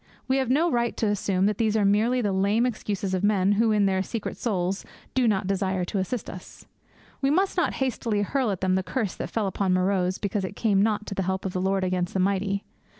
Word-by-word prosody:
We 260 +1 +2
have 265 -3 0
no 315 +7 +3
right 235 -1 0
to - - 0
assume 195 -2 +1
that 210 -1 0
these 220 -1 +2
are 205 - +2
merely 220 +5 +3
the 205 -3 0
lame 200 +5 +2
excuses 205 -5 -2
of 185 0 -1
men 200 -2 +3
who, 220 +2 +3
in 210 -1 +3
their 190 -1 +1
secret 220 +2 -4
souls, 190 -4 -1 0.3
do 255 -2 +2
not 205 -2 +1
desire 190 -1 0
to 195 - -2
assist 205 +5 -3
us. 180 - -10 0.6
We 270 - +2
must 375 +6 +2
not 355 - +1
hastily 230 -5 -1
hurl 260 +2 0
at 195 -3 -3
them 185 0 +2
the 190 - +2
curse 215 0 -2
that - - -5
fell 220 -2 -1
upon 190 0 0
Meroz 185 0 +1
because 200 -1 -2
it 190 +2 -5
came 205 -4 +2
not 210 0 +1
to 205 - -5
the 195 - -2
help 190 +1 -2
of 190 - -3
the 185 - -1
Lord 190 0 +1
against 185 +1 -1
the - - +1
mighty. 195 +1 0
200 Hz, 240 wpm, -26 LUFS, 190-225 Hz, 0.6 s, no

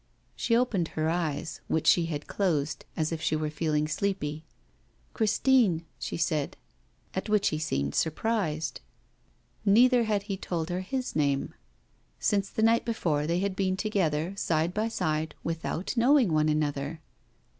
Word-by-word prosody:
She 230 - +1
opened 215 -9 +1
her 155 0 +1
eyes, 165 -2 -2
which 160 - 0
she 170 -2 +5
had 150 -3 -4
closed, 155 -7 -1
as 155 -1 0
if 165 -1 -3
she 155 - +1
were 155 -1 -2
feeling 155 -1 0
sleepy. 155 -3 -2 0.7
'Christine,' 215 -5 +3
she - - -4
said. 155 -3 -1 0.6
At 190 +3 -3
which 210 -1 +3
he 155 - -2
seemed 70 - -1
surprised. 160 - -1 0.8
Neither 240 +4 +5
had 210 -2 0
he 200 -2 -4
told 175 -2 -3
her 180 - -1
his 255 +7 -3
name. 140 -3 +1 0.7
Since 200 -1 +1
the 220 - -1
night 230 +1 +4
before 160 -10 0
they 170 +2 +1
had 200 -1 -1
been 190 -1 0
together, 185 -5 0
side 165 -2 0
by 215 +3 0
side, 155 -7 -1
without 165 +4 -3
knowing 245 - +4
one 155 0 +3
another. 150 0 -1
170 Hz, 150 wpm, -28 LUFS, 155-205 Hz, 0.8 s, she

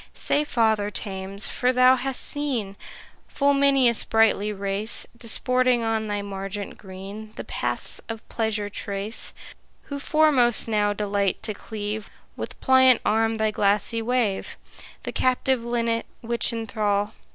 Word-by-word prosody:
Say, 295 - +1
Father 220 -6 +1
Thames, 195 -1 -5
for 250 0 +1
thou 255 0 +6
hast 265 0 -3
seen 255 -10 -2 0.5
Full 285 0 +2
many 275 -2 +4
a 235 - +4
sprightly 220 -2 +2
race 200 +2 0
Disporting 250 +1 +1
on 225 -1 0
thy 205 -1 -2
margent 195 0 -5
green 200 +3 -9
The - - -5
paths - - -4
of 225 -1 -7
pleasure 220 -2 -1
trace, 200 +2 -4 0.5
Who 285 -1 -6
foremost 280 -7 +3
now 210 -2 +2
delight 200 -2 -1
to 215 - -2
cleave 210 0 -5 0.3
With - - -7
pliant 260 -2 +6
arm 225 +1 +2
thy 220 0 +1
glassy 210 +3 +1
wave? 230 -4 -1 0.5
The - - -4
captive 255 -1 +1
linnet 235 -1 -1
which 235 0 +1
enthrall? 215 -3 -1
225 Hz, 135 wpm, -24 LUFS, 205-250 Hz, 0.5 s, thou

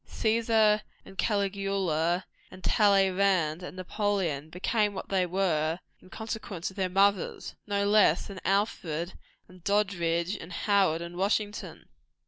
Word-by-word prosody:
Cæsar, 220 -1 +2 0.2
and 195 - -13
Caligula, 195 -4 0 0.2
and 185 - -13
Talleyrand, 195 -5 +3
and 180 +1 -8
Napoleon, 185 -6 -1
became 205 +4 0
what - - -6
they 185 -2 +1
were 165 -3 0 0.2
in - - -17
consequence 220 -5 -5
of - - -17
their 190 -2 -1
mothers, 195 0 +1
no 200 -1 0
less 205 -5 +4
than 195 -2 -9
Alfred, 185 -4 -1 0.3
and 180 -1 -17
Doddridge, 180 -3 0
and 165 - -10
Howard, 190 -4 +2
and 170 +1 -8
Washington. 205 -1 -2
195 Hz, 125 wpm, -28 LUFS, 175-205 Hz, 0.3 s, less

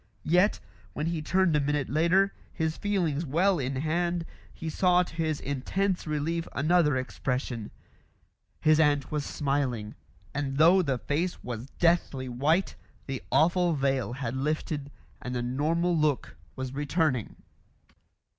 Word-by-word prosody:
Yet, 180 +6 +3 0.3
when 150 - -2
he 165 -1 -1
turned 185 +1 +2
a - - +4
minute 145 -1 0
later, 170 +7 +3 0.2
his 160 -2 -1
feelings 175 -7 0
well 175 +5 +2
in 135 0 -2
hand, 170 +4 0 0.3
he 165 - -8
saw 180 +2 +3
to 175 - -11
his 160 -2 -1
intense 175 +8 -1
relief 160 +3 -1
another 155 0 +3
expression; 125 -3 -3 0.9
his 155 0 +4
aunt 145 -3 +2
was 150 -1 -1
smiling, 135 -8 -1 0.4
and 140 -2 -2
though 170 +5 +6
the 140 -7 0
face 160 +8 -2
was 120 0 -5
deathly 165 -6 +2
white, 145 +9 +1 0.3
the 135 -2 -4
awful 170 +5 +3
veil 135 -3 0
had 125 -2 -4
lifted 145 +1 -2 0.3
and 125 0 -4
the 120 - -1
normal 160 +8 +1
look 150 -4 0 0.2
was 130 0 -5
returning. 145 - 0
150 Hz, 135 wpm, -28 LUFS, 135-170 Hz, 0.9 s, though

